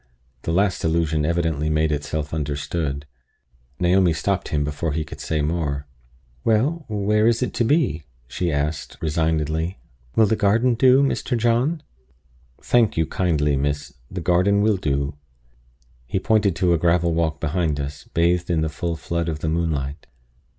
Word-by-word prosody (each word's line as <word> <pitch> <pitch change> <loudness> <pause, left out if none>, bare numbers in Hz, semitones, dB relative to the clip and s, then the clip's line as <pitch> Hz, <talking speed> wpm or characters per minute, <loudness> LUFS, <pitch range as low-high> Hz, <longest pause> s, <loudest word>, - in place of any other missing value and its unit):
The 80 - -3
last 95 +2 +1
allusion 80 -2 +1
evidently 80 -3 0
made 75 0 +1
itself 75 +1 -3
understood. 75 -1 -2 0.7
Naomi 90 -1 +3
stopped 95 +4 -1
him 75 -3 0
before 75 +1 -2
he 80 +1 -1
could 75 - -10
say 75 -2 -1
more. 75 -3 -1 0.6
"Well, 135 +9 +1
where 105 +1 +2
is 115 +2 +2
it - - -3
to - - +1
be?" 115 - +1 0.2
she 85 +7 -2
asked, 75 +1 -2
resignedly. 80 +2 -1 0.4
"Will 110 - +6
the 105 - +2
garden 110 +4 +3
do, 130 +3 +5
Mr. 135 -2 0
John?" 120 +8 +1 0.8
"Thank 115 -5 +3
you 80 - +3
kindly, 75 -4 +1
miss; 70 +1 -2 0.2
the 90 0 -5
garden 95 +4 +3
will 105 -2 +3
do." 70 -4 -1 0.9
He 95 - -1
pointed 105 -3 +2
to 90 -2 +2
a 85 - +1
gravel 85 0 +2
walk 80 -2 0
beyond 80 -1 -1
us, 70 +1 -5
bathed 85 +1 +1
in 85 -2 +1
the 80 - 0
full 85 +2 -3
flood 85 +1 -2
of 75 -2 -4
the 80 - -1
moonlight. 80 -4 -2
85 Hz, 155 wpm, -22 LUFS, 75-100 Hz, 0.9 s, Will